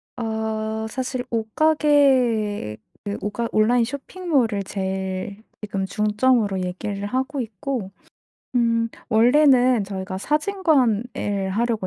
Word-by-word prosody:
어 220 -1 -3
사실 255 0 -3
옷가게 240 - +2 0.3
그 205 0 -3
옷가 230 +3 -2
온라인 235 +3 +3
쇼핑몰을 275 - -1
제일 190 +2 -4 0.2
지금 200 -2 -3
중점으로 210 -1 +1
얘기를 195 +3 -4
하고 265 +5 -2
있고 220 -1 -4 0.6
음 230 -1 +2 0.2
원래는 250 -1 +5
저희가 190 -1 -5
사진관을 250 - 0
하려고 220 -1 0
220 Hz, 230 characters per minute, -23 LUFS, 205-255 Hz, 0.6 s, 원래는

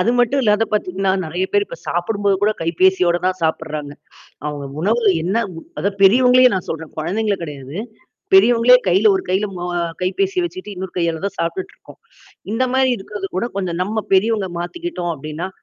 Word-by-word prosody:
அது 225 +6 +2
மட்டும் 260 +3 +3
இல்லாத 215 0 +3
பாத்தீங்கன்னா, 195 -2 0
நெறையா 175 +4 -2
பேரு 410 0 +3
இப்போ - - -9
சாப்பிடும் 200 +4 -2
போது 200 -1 +4
கூட 210 - +4
கைபேசியோட 175 +1 +3
தான் 185 0 0
சாப்பிட்றாங்க. 155 -2 -2 0.5
அவுங்க 145 -1 -4
உணவில 215 +2 +3
என்னா 195 +7 +1 0.2
உ - - -6 0.2
அதான் 200 0 -2
பெரியவங்களையே 250 +5 +6
நான் 185 - -3
சொல்றேன். 160 -1 -6
கொழந்தைங்க 200 +6 0
கெடையாது. 145 +1 -7 0.6
பெரியவங்களே 235 +5 +7
கையில 195 +4 +4
ஒரு - - -2
கையில 190 +3 +1
ம 175 0 -4 0.3
கைப்பேசிய 370 - 0
வச்சிட்டு, 345 - -7
இன்னொரு 185 0 -6
கையால 170 0 -1
தான் 200 0 -4
சாப்பிட்டுட்டு 380 - -3
இருக்கோம். - - -16 0.5
இந்த 240 +3 +1
மாரி 265 0 +3
இருக்கிறது 195 0 -6
கூட, 235 - 0
கொஞ்சம் 180 -3 -2
நம்ம 215 +3 -2
பெரியவங்க 205 0 +2
மாத்திக்கிட்டோம் 180 - -4
அப்படின்னா, 155 +5 -5
195 Hz, 170 wpm, -19 LUFS, 175-225 Hz, 0.6 s, பெரியவங்களே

